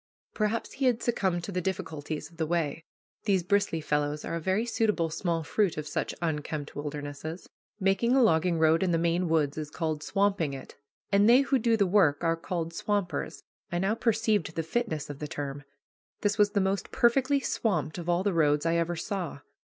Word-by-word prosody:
Perhaps 215 +1 -1
he 270 - -2
had 245 -3 +2
succumbed 190 -7 0
to 200 - -5
the 180 -1 -1
difficulties 160 -5 -4
of 165 - -19
the 160 -2 -1
way. 165 -2 -1 0.4
These 195 -4 +2
bristly 200 -3 +1
fellows 150 0 -1
are - - -4
a 170 - -1
very 190 +7 0
suitable 210 -8 0
small 165 0 -1
fruit 190 +3 0
of 155 - -3
such - - -3
unkempt 150 -2 -3
wildernesses. 145 +3 -6 0.3
Making 195 +6 +2
a 265 - +5
logging 170 -3 +3
road 160 +1 +4
in 190 - +2
the 170 - +2
Maine 170 +1 +1
woods 155 -2 +1
is 150 -1 -5
called 155 -1 -2
"swamping" 195 -7 0
it, 135 - -10 0.4
and 200 +2 +5
they 250 +3 +7
who 275 -1 +1
do 230 0 +2
the 200 - +3
work 175 -6 +3
are 165 0 +2
called 165 -1 -4
"swampers." 195 -7 -2 0.3
I 175 - 0
now 195 +4 +1
perceived 220 -7 +1
the 165 - -1
fitness 165 - -2
of 145 - -10
the 150 - -4
term. 145 -1 -5 0.6
This 205 -1 +1
was 205 -1 +3
the 200 - +2
most 190 +1 -1
perfectly 265 +4 +3
swamped 175 - -1
of 175 0 -5
all 175 +1 +2
the 200 -1 +1
roads 150 -2 +2
I 165 0 +2
ever 170 +1 0
saw. 170 -4 -4
175 Hz, 195 wpm, -28 LUFS, 155-205 Hz, 0.6 s, they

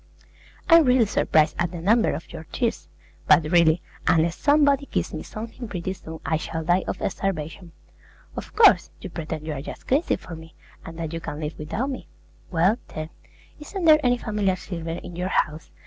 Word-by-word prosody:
I'm 330 -2 +7
really 250 -2 +5
surprised 155 -6 +2
at 175 0 +1
the 175 0 -7
number 220 +7 +3
of 165 - -9
your 160 - -8
tears; 235 -3 -2 0.4
but 165 - +6
really, 165 +1 +3 0.2
unless 165 +1 +3
somebody 285 -1 +3
gives - - -2
me - - -4
something 230 +3 -7
pretty 185 -2 -4
soon 160 -3 -10
I 160 - +1
shall 160 +1 -4
die 175 +3 +2
of - - -3
starvation. 175 -2 -4 0.6
Of - - -8
course, 235 - +6
you - - -8
pretend 160 -2 -5
you're 150 -4 -4
just - - -9
crazy 285 +6 +2
for 165 - -9
me, 160 0 -13 0.3
and 165 0 -9
that 165 -1 -4
you 165 - -4
can't 145 - -6
live 155 0 -5
without 220 - -2
me. 260 - -7 0.4
Well, 185 +7 +2
then, 155 +1 -6 0.5
isn't 350 +4 -5
there 310 -1 +6
any 245 -1 +3
family 210 -5 0
silver 175 -3 -6
in 170 +1 -6
your 180 +2 -2
house? 155 -3 -1
175 Hz, 185 wpm, -24 LUFS, 160-235 Hz, 0.6 s, I'm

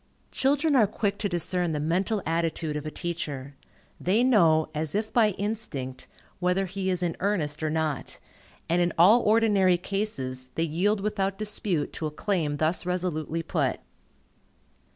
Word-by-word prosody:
Children 285 +3 +2
are 225 -5 +5
quick 205 -1 -2
to 205 - -1
discern 175 -1 0
the 150 - -1
mental 185 +7 0
attitude 165 -1 -1
of 150 0 -4
a - - -1
teacher. 150 -6 -5 0.4
They 205 +7 +2
know, 165 -11 +4
as 155 +1 -2
if 215 +1 -2
by 225 -3 +5
instinct, 195 -12 -4 0.3
whether 180 +2 +1
he 190 +1 -3
is 180 -1 0
in 170 -2 -1
earnest 160 -7 -1
or 155 - 0
not, 155 -3 -2 0.5
and 175 +2 +2
in 175 -1 +1
all 205 +9 +7
ordinary 205 -4 +4
cases 135 -10 -4
they 165 - +1
yield 190 +6 +1
without 195 -2 -1
dispute 205 -7 -2
to 155 - -3
a - - -3
claim 150 -2 -1
thus 160 +4 +1
resolutely 170 -3 -2
put. - - -1
180 Hz, 155 wpm, -27 LUFS, 155-205 Hz, 0.5 s, all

